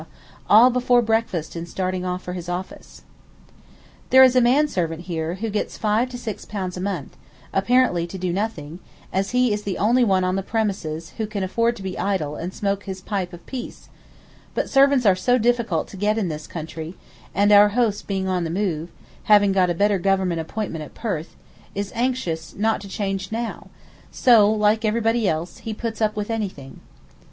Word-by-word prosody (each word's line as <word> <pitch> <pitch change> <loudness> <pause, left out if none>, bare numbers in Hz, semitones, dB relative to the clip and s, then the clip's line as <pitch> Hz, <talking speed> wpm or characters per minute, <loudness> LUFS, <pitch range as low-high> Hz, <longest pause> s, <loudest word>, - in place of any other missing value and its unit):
all 230 +5 +8
before 250 0 +3
breakfast 225 -9 -1
and 170 0 -6
starting 185 0 -2
off 180 0 -3
for 180 - -5
his 175 -1 -6
office. 180 +1 -7 1.1
There 260 0 +8
is 255 -1 +5
a 255 - +6
man 265 +6 +4
servant 170 - -2
here 165 -1 -3
who 215 +3 -4
gets 210 - -3
5 220 +3 +1
to 250 - -7
6 230 -3 -6
pounds 190 -3 -4
a 180 - -5
month, 185 -7 -4 0.4
apparently 195 -4 +2
to 190 - -7
do 180 -1 -2
nothing, 175 -6 -4 0.3
as 195 +1 0
he 250 -2 +2
is 205 - -2
the 200 -3 -3
only 240 +5 +3
one 190 -4 +2
on 185 0 0
the 195 - 0
premises 190 -7 -3
who 220 - -1
can 205 -2 -3
afford 230 +5 +1
to 200 - -10
be 190 -1 -5
idle 170 -7 -1
and 175 +4 -5
smoke 200 0 -2
his 190 -1 -5
pipe 190 -2 -3
of 175 -1 -12
peace; 255 -3 -8 0.7
but - - 0
servants 275 -2 +4
are 195 -3 +6
so 245 +7 +2
difficult 235 -8 +1
to 195 - -10
get 210 +3 +1
in 200 -6 0
this 155 -1 -6
country, 160 +1 -7 0.4
and 205 +1 +3
our 205 0 +8
host 225 -4 +1
being 190 -1 -1
on 180 -2 0
the 165 - -3
move, 170 -3 -2 0.4
having 205 -2 +5
got 185 -2 +3
a 175 - 0
better 200 +2 +2
Government 185 -2 +1
appointment 165 -2 -4
at 150 - -12
Perth, 185 -9 -4 0.4
is 200 0 -3
anxious 235 -10 -2
not 220 +1 0
to 200 - -9
change 195 -1 -3
now, 230 +1 -4 0.4
so, 225 -5 +5
like 215 +1 +2
everybody 225 0 +1
else, 160 +3 -4 0.2
puts 230 -1 -4
up 215 0 +1
with 210 +1 -3
anything. 190 -12 -5
200 Hz, 190 wpm, -22 LUFS, 180-225 Hz, 1.1 s, all